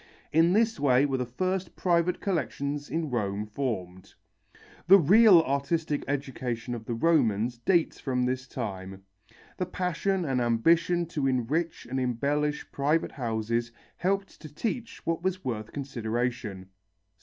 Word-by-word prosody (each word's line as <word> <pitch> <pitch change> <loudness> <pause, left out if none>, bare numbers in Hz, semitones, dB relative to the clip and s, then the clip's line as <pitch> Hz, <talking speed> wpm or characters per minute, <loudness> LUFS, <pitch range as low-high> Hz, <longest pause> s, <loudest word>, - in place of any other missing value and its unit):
In 165 +2 +5
this 225 -1 +2
way 135 -1 +4
were 135 -2 0
the 125 - -2
first 185 +7 -2
private 175 0 +1
collections 145 - -2
in 160 -3 -2
Rome 105 -3 -1
formed. 105 -6 -5 0.7
The 195 +2 +9
real 195 +2 +7
artistic 145 +2 -1
education 130 -4 -3
of 115 -2 -6
the 120 - -3
Romans 120 -5 +2
dates 170 +4 +1
from 125 -2 -1
this 130 +1 -2
time. 95 -6 -6 0.5
The 185 - -2
passion 185 +1 -1
and 130 -3 0
ambition 165 +9 +2
to 145 -4 -1
enrich 135 +7 -1
and 130 +2 -3
embellish 145 +4 -1
private 150 +4 +1
houses 115 -2 -2 0.3
helped 195 +2 -2
to 155 - -10
teach 230 - -4
what 165 0 -1
was 185 0 -2
worth 110 -3 -3
consideration. 120 -7 -3
140 Hz, 135 wpm, -28 LUFS, 120-170 Hz, 0.7 s, The